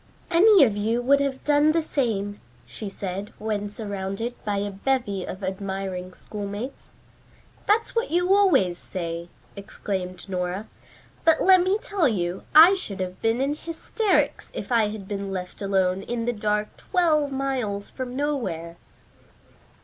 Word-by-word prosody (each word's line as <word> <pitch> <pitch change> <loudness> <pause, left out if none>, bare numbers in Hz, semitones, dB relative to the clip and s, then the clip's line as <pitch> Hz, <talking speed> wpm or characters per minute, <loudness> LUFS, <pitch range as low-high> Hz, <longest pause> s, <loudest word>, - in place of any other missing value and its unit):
"Any 385 +1 +7
of 220 -6 +3
you 220 +3 0
would 275 +3 +4
have 275 -1 -2
done 295 +1 +4
the 330 0 +1
same," 205 -9 -1 0.2
she 125 - -6
said 195 +1 -5
when 210 -1 -2
surrounded 205 +2 -4
by 205 -1 -1
a 205 0 -2
bevy 200 -2 -1
of 190 +2 -7
admiring 190 -1 -4
schoolmates. 210 +5 -6 0.8
"That's 445 +3 +2
what 465 +2 0
you 355 +3 +3
always 275 - +4
say," 170 -1 -5 0.3
exclaimed 190 -2 -5
Nora. 185 +2 -3 0.6
"But 325 -1 +5
let 375 -1 +7
me 375 +3 +2
tell 405 -6 +1
you 180 -5 -1
I 330 +5 +10
should 215 - -5
have 185 0 -4
been 225 +3 +1
in 280 +2 +1
hysterics 335 +6 -1
if - - -6
I 230 -3 +4
had 210 -2 -7
been 200 -1 -4
left 180 0 -6
alone 190 -1 +1
in 235 +1 -3
the 245 - 0
dark 210 -1 -1
twelve 310 -6 +1
miles 255 -7 -2
from 255 -1 -5
nowhere." 190 - -2
210 Hz, 150 wpm, -25 LUFS, 195-285 Hz, 0.8 s, I